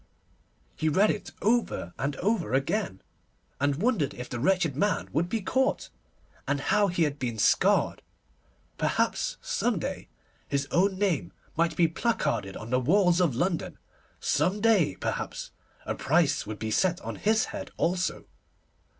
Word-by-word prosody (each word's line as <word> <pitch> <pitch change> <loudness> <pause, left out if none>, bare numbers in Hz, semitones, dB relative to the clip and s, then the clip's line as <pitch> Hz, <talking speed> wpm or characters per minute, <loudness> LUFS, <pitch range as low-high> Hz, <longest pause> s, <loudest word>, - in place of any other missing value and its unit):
He 155 - 0
read 195 +8 +4
it 210 - -5
over 220 - +1
and 140 +1 -1
over 190 - 0
again, 135 - -1 0.6
and 145 0 +2
wondered 180 - 0
if 125 0 -6
the 120 - -4
wretched 170 0 +2
man 205 +8 0
would 170 +4 +1
be 225 +2 -1
caught, 265 +7 0 0.6
and 145 0 +1
how 205 +8 +2
he 175 -2 +1
had 145 -2 -1
been 120 -3 -3
scarred. - - +3 0.8
Perhaps, - - 0
some - - 0
day, - - -4 0.4
his 140 0 -1
own 190 +2 +2
name 170 - 0 0.2
might 165 0 +1
be 165 +1 +4
placarded 120 - -1
on 110 +2 -8
the 125 - +3
walls 180 +6 +3
of 160 -9 +2
London. 175 +5 -1 0.4
Some 180 +8 +1
day, 205 - +3
perhaps, - - -4 0.3
a - - -1
price 145 -5 +1
would 110 0 -5
be 110 0 -4
set 180 - +2
on - - -5
his 220 +1 +2
head - - -5
also. 180 +2 0
170 Hz, 150 wpm, -28 LUFS, 135-200 Hz, 0.8 s, read